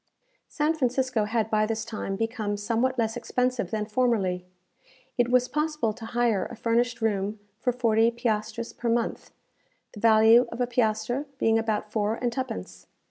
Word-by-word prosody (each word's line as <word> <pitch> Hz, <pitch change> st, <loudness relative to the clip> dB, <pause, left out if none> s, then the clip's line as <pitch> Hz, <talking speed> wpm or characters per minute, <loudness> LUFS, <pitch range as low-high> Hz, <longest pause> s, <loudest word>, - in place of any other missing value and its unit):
San 300 Hz, +1 st, 0 dB
Francisco 255 Hz, -5 st, 0 dB
had 220 Hz, 0 st, -1 dB
by 215 Hz, 0 st, +3 dB
this 220 Hz, -1 st, -2 dB
time 210 Hz, -3 st, -4 dB
become 220 Hz, -1 st, -2 dB
somewhat 235 Hz, +5 st, 0 dB
less 225 Hz, -1 st, 0 dB
expensive 250 Hz, -3 st, -1 dB
than 215 Hz, -1 st, -2 dB
formerly. 210 Hz, -6 st, 0 dB, 0.7 s
It 245 Hz, -1 st, +2 dB
was 250 Hz, 0 st, +3 dB
possible 300 Hz, -7 st, -1 dB
to 225 Hz, +1 st, -9 dB
hire 235 Hz, -5 st, +1 dB
a 235 Hz, -, -9 dB
furnished 235 Hz, +1 st, 0 dB
room 210 Hz, -1 st, -1 dB, 0.2 s
for 250 Hz, -, +1 dB
forty 230 Hz, -2 st, +3 dB
piastres 230 Hz, -1 st, -2 dB
per 235 Hz, -, -3 dB
month, 230 Hz, 0 st, -1 dB, 0.6 s
the 210 Hz, -, -9 dB
value 225 Hz, +2 st, +6 dB
of 230 Hz, -, -7 dB
a 245 Hz, -, +2 dB
piastre 240 Hz, +3 st, 0 dB
being 225 Hz, -2 st, +3 dB
about 215 Hz, -1 st, -2 dB
four 215 Hz, 0 st, 0 dB
and 240 Hz, 0 st, -2 dB
twopence. 90 Hz, -, -5 dB
230 Hz, 160 wpm, -26 LUFS, 215-245 Hz, 0.7 s, value